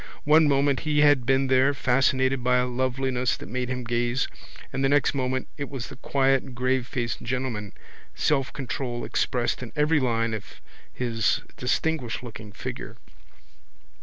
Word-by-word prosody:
One 155 +1 +6
moment 140 -1 +2
he 150 -1 +1
had 145 -5 +4
been 135 0 +3
there, 130 +2 +3
fascinated 130 0 +2
by 125 0 +3
a 125 - +2
loveliness 130 0 0
that - - -9
made 125 +2 -3
him 125 -1 -3
gaze, 120 +2 0 0.5
and 135 +1 -1
the 135 - +3
next 145 0 +3
moment 130 -1 -1
it 140 -2 -4
was 130 -5 -5
the - - -9
quiet 135 -1 +1
gravefaced 125 -1 -1
gentleman, 120 -5 -3 0.4
selfcontrol 135 -3 -1
expressed 125 -2 0
in 125 - -7
every 150 +1 +3
line 115 -3 0
of 110 -3 -7 0.3
his 115 -4 0
distinguishedlooking 120 -6 -2
figure. - - -6
130 Hz, 140 wpm, -26 LUFS, 120-135 Hz, 0.5 s, One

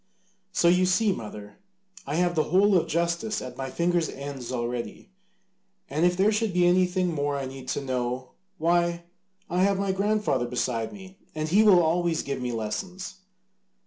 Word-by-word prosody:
So 170 - +2
you 180 +1 +4
see, 205 +3 +3
mother, 105 - -7 0.5
I 145 - -2
have 175 +1 +2
the 155 -2 +1
whole 195 +4 +4
of 175 - +2
justice 170 +6 -1
at 130 - -7
my 135 0 -4
fingers' 170 +2 0
ends 140 -3 -6
already. 120 - -4 0.8
And 155 +5 +3
if 180 0 0
there 200 +3 +4
should 215 -2 0
be 180 0 +3
anything 180 0 +2
more 145 -1 -1
I 135 - -3
need 130 0 -9
to 145 - -2
know, 125 0 -2 0.3
why, 170 +1 +1 0.4
I 180 +2 0
have 195 0 +3
my 195 0 0
grandfather 200 - 0
beside 120 -2 -2
me, 190 -1 -12 0.2
and 155 0 -2
he 200 +6 +5
will 195 -5 +6
always 165 0 +1
give 140 -2 -4
me 125 -1 -2
lessons." 180 - -5
170 Hz, 175 wpm, -26 LUFS, 130-185 Hz, 0.8 s, will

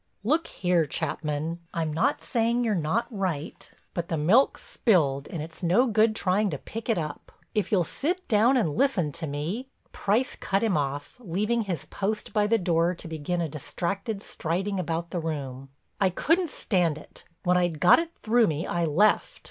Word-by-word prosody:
"Look 310 +9 +1
here, 175 -4 +1
Chapman, 155 +3 -2 0.2
I'm 160 -2 -1
not 260 - +1
saying 235 0 +1
you're 225 -2 +1
not 175 +6 0
right, 180 -7 -3 0.2
but 170 -1 -3
the 165 - -1
milk's 190 - +3
spilled 155 - +2
and 160 -3 -5
it's 165 +3 -9
no 185 +9 +4
good 220 -2 +3
trying 200 +1 +1
to 150 - -3
pick 225 - -7
it 225 - +3
up. 155 -3 -5 0.2
If 210 -2 -1
you'll 190 -4 +4
sit 355 - -2
down 235 +4 +4
and 165 -12 +1
listen 225 - +2
to 160 +3 -5
me—" 160 - -3 0.2
Price 220 +6 0
cut 195 +3 -1
him 220 -4 +2
off, 145 -1 -2
leaving 210 +3 0
his 180 -9 -3
post 210 +2 -3
by 210 -1 +3
the 230 +2 +3
door 175 -2 +1
to 170 - -7
begin 165 +2 -2
a 165 - 0
distracted 195 - -4
striding 190 +5 -2
about 170 0 -3
the 175 - -1
room: 135 -5 -5 0.3
"I 195 - +4
couldn't 330 - +1
stand 175 - 0
it—when 175 +3 -3
I'd 175 -4 0
got 180 - +7
it 330 0 -2
through 230 0 +4
me 155 0 -1
I 170 -1 0
left. 175 +8 +2
180 Hz, 180 wpm, -27 LUFS, 160-220 Hz, 0.3 s, got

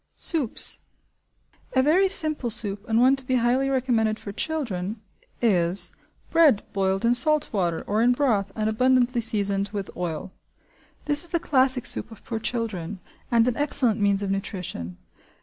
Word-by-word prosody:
Soups. 300 -9 +1 1.0
A 260 - +4
very 365 +7 +3
simple 310 -9 +2
soup, 205 0 0
and 225 +1 +2
one 260 +2 +5
to 270 - -6
be 255 0 -1
highly 250 +3 +1
recommended 235 -5 0
for 200 - -8
children, 220 - -4 0.4
is 180 -4 +2 0.4
bread 310 -10 +4
boiled 195 +2 0
in 235 - +4
salt 300 +3 +1
water 175 -5 -1
or 210 +2 0
in 240 +1 +4
broth 230 -7 0
and 215 -1 -1
abundantly 250 +2 +2
seasoned 200 -3 -1
with 200 -2 -5
oil. 175 0 -5 0.7
This 295 +3 +4
is - - -8
the 340 - 0
classic 260 -4 +1
soup - - -2
of 225 - -15
poor 225 -2 -4
children 210 -6 -4 0.3
and 235 -1 +3
an 245 - 0
excellent 250 -6 +1
means 200 0 +2
of 195 - -2
nutrition. 180 - -5
230 Hz, 160 wpm, -24 LUFS, 200-260 Hz, 1.0 s, one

